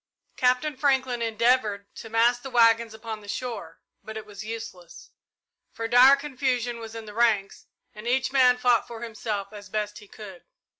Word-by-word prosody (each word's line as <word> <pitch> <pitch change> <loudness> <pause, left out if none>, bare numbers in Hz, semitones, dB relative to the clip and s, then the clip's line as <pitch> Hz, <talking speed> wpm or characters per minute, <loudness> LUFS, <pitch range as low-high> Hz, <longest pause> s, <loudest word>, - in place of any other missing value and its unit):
Captain 255 +4 +1
Franklin 260 -3 +1
endeavoured 225 -2 +1
to 225 - -10
mass 235 +2 +3
the 265 - -8
waggons 230 -2 +4
upon 220 -1 -7
the 205 - -14
shore, 220 -8 -6 0.2
but 220 +1 -7
it 220 - -7
was 205 -1 -9
useless, 215 -6 -9 0.6
for 230 - -4
dire 250 +4 +7
confusion 255 -4 -2
was 225 0 -9
in 225 -1 -7
the 210 - -10
ranks 215 -4 +1 0.3
and 215 +2 -9
each 260 +1 +1
man 255 -2 +5
fought 245 -2 +2
for 235 0 -8
himself 215 -3 -5
as 205 -1 -11
best 210 +1 -3
he 205 - -15
could. 195 -4 -11
230 Hz, 170 wpm, -26 LUFS, 215-250 Hz, 0.6 s, dire